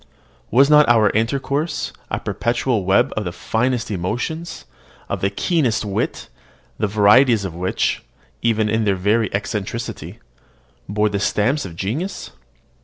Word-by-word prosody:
Was 135 +4 +5
not 150 -2 +6
our 110 -3 +5
intercourse 140 +7 -1 0.2
a - - -2
perpetual 120 -3 -1
web 95 +1 +3
of 110 - -1
the 90 - -4
finest 120 +5 -1
emotions, 120 - -4 0.4
of - - -3
the 95 - +2
keenest 120 - 0
wit, 100 -1 -3 0.5
the 105 - +1
varieties 105 +2 +4
of 95 - -5
which, 90 +2 -1 0.4
even 110 -2 +1
in 110 +1 +1
their 100 -2 +2
very 105 +3 +1
eccentricity, 105 +3 -4 0.7
bore 105 +1 +1
the 100 -1 -2
stamp 115 +8 +1
of 85 -3 -8
genius? 150 - -4
110 Hz, 135 wpm, -20 LUFS, 100-130 Hz, 0.7 s, not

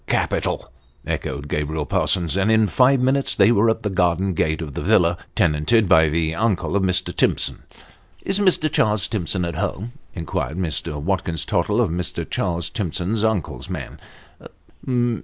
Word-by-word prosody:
" - - -37
Capital! - - -1 0.2
" - - -33
echoed 70 +1 -4
Gabriel 75 +1 -2
Parsons; 85 0 0
and 100 +3 +2
in 110 -1 +4
five 125 +10 +3
minutes 135 +2 +2
they 100 +3 +5
were 115 0 +3
at 110 - -1
the 105 - -1
garden 90 +1 +1
gate 80 -1 0
of 75 -4 -6
the - - -4
villa 85 0 +3 0.2
tenanted 80 +9 +2
by 80 -2 +5
the 80 0 0
uncle 100 0 0
of 100 - +2
Mr. 90 -1 0
Timson. - - +1 0.3
" - - -31
Is 195 +1 +1
Mr. 185 -6 +3
Charles 105 -8 +1
Timson 90 -3 -1
at 85 - -3
home? 105 +6 -3
" - - -33
inquired 80 -1 -3
Mr. 80 -4 -2
Watkins 85 -1 -1
Tottle 105 +3 0
of 110 -9 +2
Mr. 85 -2 -3
Charles 85 -1 -2
Timson's 100 +1 -2
uncle's 110 -5 -2
man. - - -6
90 Hz, 175 wpm, -21 LUFS, 80-110 Hz, 0.3 s, they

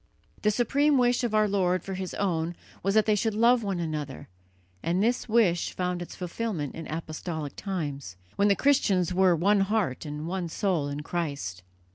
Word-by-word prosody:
The 210 - +3
supreme 275 +6 +2
wish 245 0 +3
of 230 -3 0
our 215 0 +4
Lord 185 -3 +1
for 195 - -5
His 185 -1 -4
own 170 -3 -1 0.3
was 195 +2 0
that 215 - +5
they 215 - +3
should 210 +1 0
love 235 +2 +4
one 195 -4 -2
another, 150 - -4 0.5
and 180 +4 +1
this 240 +1 0
wish 210 -7 +2
found 180 -1 -2
its 175 - -7
fulfilment 180 - -3
in 165 - -7
apostolic 155 -1 -5
times, 145 - -4 0.2
when 200 - +3
the 200 - +4
Christians 195 - +2
were 185 -1 +4
one 200 +5 +3
heart 195 - 0
and 150 0 -5
one 180 -1 -3
soul 170 -5 0
in 145 +1 -4
Christ. 145 - -3
185 Hz, 180 wpm, -27 LUFS, 160-210 Hz, 0.5 s, that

